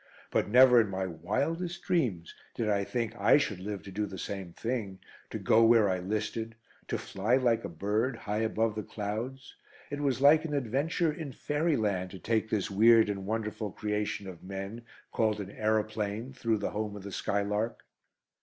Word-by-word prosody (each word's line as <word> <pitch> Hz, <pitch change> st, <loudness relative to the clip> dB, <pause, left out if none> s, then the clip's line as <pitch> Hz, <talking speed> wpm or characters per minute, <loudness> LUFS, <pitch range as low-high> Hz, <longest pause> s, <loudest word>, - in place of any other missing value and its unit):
But -, -, +1 dB
never 125 Hz, +1 st, +8 dB
in 105 Hz, -, -2 dB
my 95 Hz, 0 st, -2 dB
wildest 150 Hz, -, -2 dB
dreams 110 Hz, -, 0 dB, 0.2 s
did 115 Hz, -, -1 dB
I 100 Hz, -1 st, +2 dB
think 115 Hz, +1 st, -2 dB
I -, -, +5 dB
should 105 Hz, -10 st, -1 dB
live 100 Hz, -1 st, -5 dB
to 95 Hz, -, -9 dB
do 105 Hz, +2 st, -2 dB
the 95 Hz, -1 st, -8 dB
same 95 Hz, -2 st, -5 dB
thing, 110 Hz, -2 st, -3 dB, 0.3 s
to -, -, -4 dB
go 115 Hz, +1 st, +4 dB
where 115 Hz, -2 st, +6 dB
I 90 Hz, -, 0 dB
listed; 110 Hz, +4 st, -3 dB, 0.3 s
to -, -, -1 dB
fly 105 Hz, +6 st, 0 dB
like 120 Hz, -3 st, +2 dB
a -, -, -4 dB
bird, 105 Hz, +9 st, -1 dB
high 105 Hz, -1 st, -3 dB
above 110 Hz, 0 st, +1 dB
the 110 Hz, -, -3 dB
clouds. 110 Hz, +7 st, -5 dB, 0.4 s
It 145 Hz, -, -3 dB
was 135 Hz, -3 st, +1 dB
like 145 Hz, +3 st, +6 dB
an 150 Hz, -3 st, -3 dB
adventure 145 Hz, +6 st, 0 dB
in 150 Hz, -3 st, -6 dB
fairyland 115 Hz, -, 0 dB
to 95 Hz, -, -9 dB
take 110 Hz, +1 st, 0 dB
this 105 Hz, -2 st, -1 dB
weird 110 Hz, +1 st, +6 dB
and 95 Hz, -1 st, -5 dB
wonderful 110 Hz, -1 st, -2 dB
creation 105 Hz, -1 st, -2 dB
of 90 Hz, -3 st, -9 dB
men, 100 Hz, +5 st, -6 dB, 0.3 s
called 110 Hz, -2 st, +1 dB
an 100 Hz, -1 st, -6 dB
aeroplane, 110 Hz, +2 st, -1 dB
through 115 Hz, -3 st, 0 dB
the -, -, -3 dB
home 105 Hz, -1 st, -3 dB
of 100 Hz, -, -8 dB
the 100 Hz, -, -7 dB
skylark. 105 Hz, +4 st, -1 dB
110 Hz, 180 wpm, -30 LUFS, 100-120 Hz, 0.4 s, never